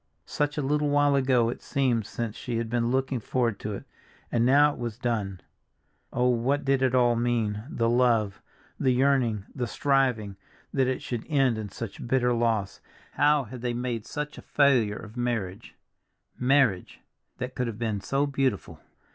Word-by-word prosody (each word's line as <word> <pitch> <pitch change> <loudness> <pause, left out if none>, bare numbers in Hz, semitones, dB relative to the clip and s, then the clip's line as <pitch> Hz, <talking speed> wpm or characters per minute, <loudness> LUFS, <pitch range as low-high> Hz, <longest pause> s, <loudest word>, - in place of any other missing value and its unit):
Such 145 0 -2
a 150 - 0
little 150 +2 +1
while 145 0 +3
ago 130 -4 +3
it 120 - -5
seemed 125 -7 0
since 115 -2 -4
she 120 -2 -4
had 115 -1 -3
been 120 -1 +1
looking 130 0 0
forward 115 -1 -1
to 105 - -4
it, 100 - -6 0.5
and 115 - +2
now 145 +4 +5
it - - -12
was 120 -2 -4
done. 110 -7 -2 0.7
Oh, 125 +1 +1
what 125 +4 +1
did 135 -1 +2
it 130 -1 +2
all 120 -1 +4
mean, 115 -3 0
the 115 -5 0
love, 115 -4 +2 0.4
the 130 - +2
yearning, 125 -5 +2
the 125 -3 -2
striving, 125 -8 +1 0.4
that 135 -2 +2
it 130 - -2
should 120 -3 -4
end 135 -7 +2
in 105 -2 -5
such 115 +3 -7
bitter 125 -1 +2
loss; 115 -4 0 0.3
how 145 0 +3
had 125 +1 -9
they 120 -1 -1
made 120 -2 -3
such 150 0 -5
a - - -9
failure 125 -8 +2
of 110 +2 -11
marriage—marriage, 120 +1 -2 0.4
that 125 0 -5
could 125 -1 -2
have 115 -3 -5
been 110 -4 -2
so 140 +6 0
beautiful! 135 -6 -1
120 Hz, 170 wpm, -27 LUFS, 115-135 Hz, 0.7 s, now